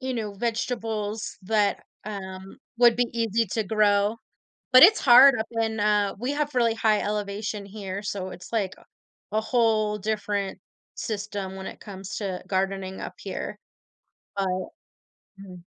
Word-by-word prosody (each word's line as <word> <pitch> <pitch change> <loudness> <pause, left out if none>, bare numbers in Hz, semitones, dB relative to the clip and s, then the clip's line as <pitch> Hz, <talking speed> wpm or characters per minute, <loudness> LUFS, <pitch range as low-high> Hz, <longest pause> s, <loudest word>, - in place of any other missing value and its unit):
you 260 -1 -3
know, 215 -3 -3
vegetables 220 -1 -3
that, 205 0 +1 0.2
um, 190 -2 -7 0.2
would 240 -2 +6
be 245 0 +2
easy 230 -1 +1
to 220 - +1
grow, 205 +1 +2 0.6
but 255 +2 +10
it's 425 +5 +8
hard 260 +1 +8
up 220 - -2
in, 220 -1 -1
uh 205 -1 +2
we 250 +5 -1
have 295 -1 -2
really 230 -2 +3
high 215 -2 +2
elevation 205 0 -3
here, 200 -1 -6
so, 195 -2 -4
it's 185 +1 -11
like 200 -4 0
a - - -19 0.5
a 215 +1 +1
whole 220 -3 +2
different 210 -1 -2 0.4
system 200 -3 -4
when 190 - -7
it - - -8
comes 195 -1 -8
to 190 -4 -3
gardening 190 0 -2
up - - -6
here, - - -5 0.8
but 195 -1 0 0.9
hmm. 190 -2 -10
210 Hz, 150 wpm, -26 LUFS, 195-225 Hz, 0.9 s, but